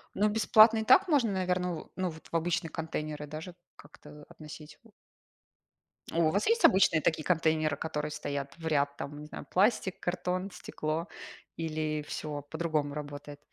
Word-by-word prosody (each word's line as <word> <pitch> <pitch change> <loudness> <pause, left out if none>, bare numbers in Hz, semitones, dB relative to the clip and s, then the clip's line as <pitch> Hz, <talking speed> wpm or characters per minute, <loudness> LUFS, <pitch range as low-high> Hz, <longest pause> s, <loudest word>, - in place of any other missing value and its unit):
Ну, 210 +2 +3
бесплатно 220 +1 +6
и 220 - 0
так 375 - +6
можно, 275 - +3
наверное, 180 -1 0
в 160 - -8
ну, 185 -1 -1
вот, 160 0 -13
в - - -4
обычные 165 +1 0
контейнеры 155 -1 -4
даже 155 +4 -8 0.2
как-то 150 0 -15
относить. 150 -1 -11 1.3
О, - - -4
у - - +2
вас 200 +4 0
есть 460 +1 +4
обычные 185 -4 +5
такие 155 +1 +1
контейнеры, 155 -3 +1
которые 150 -1 -3
стоят 140 -2 -4
в 165 -1 -6
ряд, 145 -2 +1
там, 145 +1 -6
не - - -8
знаю, - - -8
пластик, 190 -1 +2
картон, 180 +2 -2
стекло, 155 0 -4 0.5
или 155 -2 -2
всё 150 -2 -4
по-другому 155 -4 -1
работает? 145 0 -7
160 Hz, 160 wpm, -30 LUFS, 150-185 Hz, 1.3 s, бесплатно